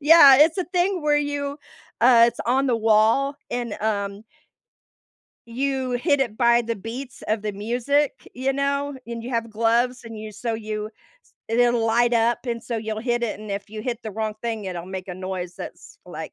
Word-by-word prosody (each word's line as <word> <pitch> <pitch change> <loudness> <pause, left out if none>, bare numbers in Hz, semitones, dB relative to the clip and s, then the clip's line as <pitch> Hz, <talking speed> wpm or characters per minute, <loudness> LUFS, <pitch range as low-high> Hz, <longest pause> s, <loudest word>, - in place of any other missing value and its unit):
yeah, 290 -3 +8
it's 320 +4 +5
a 370 - 0
thing 360 0 0
where 295 -1 +3
you, 285 0 -3 0.4
uh, 235 0 +7
it's - - -6
on 265 +3 +2
the 245 -3 +2
wall 225 +6 +3
and, 240 -3 -3
um 200 -1 -2 1.2
you 260 +2 -2
hit 285 +4 +1
it 235 -5 -1
by 235 -1 +4
the 230 0 -3
beats 235 +5 -8
of 215 0 0
the 210 0 -2
music, 245 +8 -1
you 265 +2 -1
know, 280 +1 -1
and 235 -1 -6
you 245 - -6
have 230 -2 -2
gloves 235 +3 +1
and 225 -1 -9
you 215 0 -7
so 230 +2 -3
you 215 -1 -4
s 215 - -23 0.4
it'll 240 0 +3
light 240 +2 +3
up 230 +1 +3
and 235 -1 -3
so 235 - -3
you'll 220 0 -4
hit 240 0 -1
it 230 -3 -2
and 215 0 -9
if 200 +1 -4
you 215 0 -7
hit 240 -1 -4
the 220 - -5
wrong 215 +1 -3
thing, 225 -3 -3
it'll 180 -2 -5
make 190 0 -6
a 180 - -5
noise 185 -1 -5
that's - - -10
like - - -7
235 Hz, 200 wpm, -23 LUFS, 215-265 Hz, 1.2 s, yeah